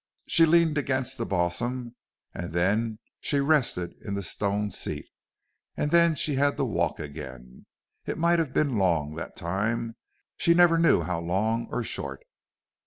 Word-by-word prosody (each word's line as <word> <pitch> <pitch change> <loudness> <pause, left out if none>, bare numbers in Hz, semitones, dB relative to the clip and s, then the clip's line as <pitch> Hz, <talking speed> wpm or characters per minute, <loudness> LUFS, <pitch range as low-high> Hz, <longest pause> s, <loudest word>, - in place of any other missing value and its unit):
She 165 -1 +5
leaned 160 -2 +4
against 130 -2 -1
the 115 - -2
balsam 115 +8 -2 0.4
and 85 -2 -6
then 105 +6 +1 0.2
she 145 - 0
rested 140 - +1
in 100 - -4
the 100 - -3
stone 100 +3 -1
seat, - - -4 0.7
and 150 - -1
then 170 -1 +5
she 150 +1 0
had 140 +1 +2
to 135 - +1
walk 85 -8 -1
again. 65 -4 -9 0.4
It - - -2
might 170 +1 +3
have 160 -5 -1
been 140 -4 +1
long, 85 -6 +1
that 85 - -6
time; 110 +6 -2 0.4
she 170 - +3
never 170 -1 +5
knew 165 - +4
how 90 -2 -2
long 110 +7 0
or 125 - -2
short. 70 -10 -5
115 Hz, 160 wpm, -27 LUFS, 85-145 Hz, 0.7 s, She